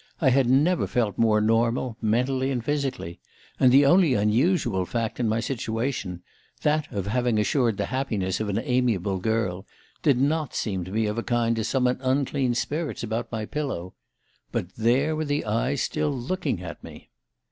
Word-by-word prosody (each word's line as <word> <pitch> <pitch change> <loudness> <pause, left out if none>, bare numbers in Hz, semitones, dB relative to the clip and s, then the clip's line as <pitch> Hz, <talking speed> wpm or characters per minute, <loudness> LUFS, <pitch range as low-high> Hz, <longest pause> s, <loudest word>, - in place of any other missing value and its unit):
I 135 -6 +4
had 130 -1 +3
never 150 +7 +3
felt 110 -5 -1
more 110 -2 +4
normal, 115 +2 +1
mentally 130 +4 +1
and 125 -4 -2
physically; 140 - -2 0.4
and 130 - +5
the 140 +2 +6
only 160 -2 +5
unusual 110 - +2
fact 115 +4 -3
in 120 -3 +1
my 110 +1 +1
situation 115 -6 -3 0.4
that 150 0 +1
of 100 -5 -3
having 120 +2 0
assured 115 0 +1
the - - -1
happiness 110 -9 -2
of 110 -1 -2
an 100 - -1
amiable 110 -6 0
girl 95 -3 -1 0.3
did 145 -5 +3
not 150 +1 0
seem 95 -5 -2
of 105 +2 -1
a - - -1
kind 115 -1 +1
to 110 - -1
summon 125 +2 +1
unclean 130 -1 0
spirits 150 +5 -2
about 115 +1 -3
my 110 -2 -3
pillow. 130 - -4 0.6
But 90 - -3
there 130 +8 +2
were 155 0 -2
the 145 0 -1
eyes 120 +6 0
still 155 -1 -1
looking 135 - -2
at 85 -1 -8
me - - -12
120 Hz, 170 wpm, -25 LUFS, 110-135 Hz, 0.6 s, the